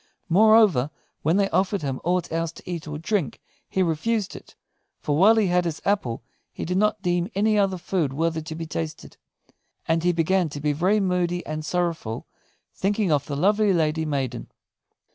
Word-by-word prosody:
Moreover, 205 - +5 0.3
when 160 +5 +2
they 200 -1 +3
offered 195 -1 +1
him 135 -2 -3
aught 175 0 0
else 165 0 -1
to - - -15
eat 170 -3 -5
or 150 0 -5
drink 175 - -2 0.3
he 190 - +1
refused 190 +6 -1
it; - - -13 0.4
for 145 - -1
while 200 +8 +6
he 220 -2 +3
had 180 -1 +2
his 165 -2 -3
apple 130 - 0 0.3
he - - -6
did 180 +3 -1
not 210 -1 +1
deem 175 0 0
any 215 +2 +2
other 195 -2 +2
food 175 -5 -1
worthy 160 +3 -1
to 155 0 -7
be 165 0 -5
tasted. 80 - -6 0.7
And 165 0 +1
he 180 - +3
began 175 +1 +1
to 145 - -7
be 150 0 0
very 185 +8 +2
moody 180 -2 0
and 155 0 -4
sorrowful, 165 -9 -2 0.5
thinking 200 -1 0
of 145 -2 +1
the 145 - -3
lovely 205 +6 +3
fairy 160 -2 +1
maiden. 135 -5 -3
175 Hz, 180 wpm, -24 LUFS, 155-195 Hz, 0.7 s, while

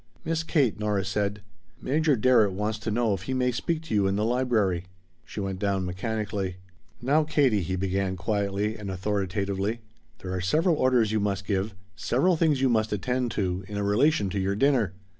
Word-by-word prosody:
"Miss 165 0 0
Kate," 140 -9 +1
Nora 105 -2 0
said, 100 +1 -2 0.4
"Major 150 +2 +2
Darrett 115 -4 +4
wants 105 +3 -2
to 110 - -4
know 110 -1 +1
if 95 - -3
he 130 +7 -3
may 125 -1 +2
speak 160 +6 -2
to 160 - -6
you 100 -2 +3
in 95 - 0
the 105 +2 0
library." 110 -8 +1 0.4
She - - -7
went 95 -2 -3
down 100 -2 0
mechanically. 100 0 -3 0.5
"Now, 145 +5 +3
Katie," 140 -9 +2
he 95 +2 -2
began 95 0 -1
quietly 100 +2 -1
and 105 -2 -6
authoritatively, 100 +2 -2 0.4
"there 95 0 -6
are 95 - -2
several 160 - +2
orders 125 -5 +3
you 110 - +1
must 100 -1 -1
give, 100 0 -1 0.2
several 135 - +2
things 155 -4 +2
you 135 - +4
must 110 -3 +1
attend 125 +4 -1
to, 95 -1 -1
in 100 0 -4
relation 105 +1 +2
to 100 - -1
your 95 +1 0
dinner. 120 -6 +2
105 Hz, 185 wpm, -26 LUFS, 95-125 Hz, 0.5 s, Darrett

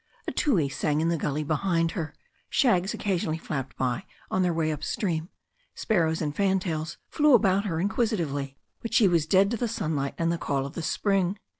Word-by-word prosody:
A - - 0
tui 190 - +2
sang 150 +2 -1
in 165 +1 +1
the 170 - +2
gully 150 -1 -1
behind 165 +2 +1
her, 155 -4 -4 0.3
shags 195 -8 +2
occa 195 -3 0
sionally 160 -1 -2
flapped 135 -5 -5
by 125 -2 -1 0.3
on 185 - +2
their 180 -1 +2
way 160 -1 0
up 150 0 -5
stream, 175 -4 -2 0.5
sparrows 165 -6 +1
and 150 -1 -3
fantails 185 -5 0
flew 300 -3 +4
about 200 -2 +3
her 165 -5 -1
inquisitively. 170 - -1 0.2
But 230 - -3
she 215 - +6
was 165 -4 +2
dead 195 +4 +4
to 235 - 0
the 240 - -1
sunlight 155 -10 -2
and 165 0 +1
the 170 - -2
call 135 -1 -1
of 140 - -7
the - - -4
spring. 195 +3 0
170 Hz, 195 wpm, -27 LUFS, 155-195 Hz, 0.5 s, she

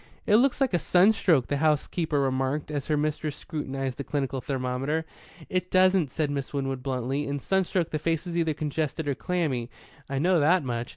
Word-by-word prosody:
"It 210 - +5
looks 260 +2 +3
like 270 -6 +1
a 175 - +3
sunstroke," 180 - +4
the 145 - -1
housekeeper 155 +1 +1
remarked, 135 +2 -1
as 145 -3 -3
her 150 - +1
mistress 150 0 -1
scrutinized 135 -4 -4
the - - -2
clinical 135 -3 -2
thermometer. 135 +4 -2 0.4
"It 180 0 -2
doesn't," 185 -4 +4
said 150 +1 -1
Miss 140 0 -4
Winwood 135 -2 -2
bluntly. 135 +2 -2
"In 140 0 -2
sunstroke 185 +2 0
the 155 - -1
face 165 +2 -1
is 175 -1 -5
either 165 -3 +1
congested 155 +1 -2
or 140 - +1
clammy. 140 -8 -2 0.4
I 135 - -2
know 175 +4 +3
that 165 +3 +4
much. 120 -2 -3
150 Hz, 185 wpm, -27 LUFS, 135-170 Hz, 0.4 s, It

